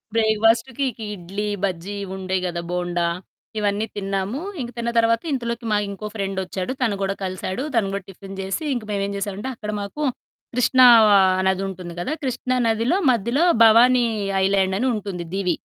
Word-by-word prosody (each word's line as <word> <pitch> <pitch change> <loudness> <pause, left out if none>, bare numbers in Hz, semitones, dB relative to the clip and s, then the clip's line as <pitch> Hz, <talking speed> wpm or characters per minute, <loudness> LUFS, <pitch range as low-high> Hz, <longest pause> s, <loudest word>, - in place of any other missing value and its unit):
బ్రేక్‌ఫాస్ట్‌కి 225 +4 +2
ఇకి 225 -2 -8
ఇడ్లీ, 195 +4 -5 0.2
బజ్జీ 190 +1 -2
ఇవి 190 -1 -6
ఉంటాయి 185 0 -1
గదా! 170 -1 -3
బోండా 175 -1 -1 0.5
ఇవన్నీ 205 +1 0
తిన్నాము. 195 +5 -2 0.2
ఇంక 240 - -4
తిన్న 235 0 -1
తర్వాత, 230 0 +3
ఇంతలోకి 235 -2 -3
మాకు 205 -1 +2
ఇంకో 205 +2 -7
ఫ్రెండొచ్చాడు. 195 +1 -3
తను 220 -5 +1
కూడా 195 0 -1
కలిసాడు. 185 +5 -3
తన 230 - +4
గూడా 200 -1 -3
టిఫిన్ 195 +1 -10
జేసి 195 +9 -3
ఇంక 240 - -3
మేమేం 200 0 -1
జేసామంటే, 205 +5 -4
అక్కడ 210 -1 -5
మాకు 250 +10 -5 0.5
కృష్ణా 250 +1 +6 0.3
ఆహ్, 185 -1 +4
నది 190 0 0
ఉంటుంది 180 -2 -8
కదా! 295 - -2
కృష్ణా 255 0 -1
నదిలో 230 - +1
మధ్యలో 240 - +1 0.2
భవానీ 240 +2 +6 0.4
ఐలాండ్ 190 -1 +2
అని 260 - +1
ఉంటుంది 190 -4 -5
దివీ. 180 -4 0
200 Hz, 160 wpm, -22 LUFS, 190-230 Hz, 0.5 s, కృష్ణా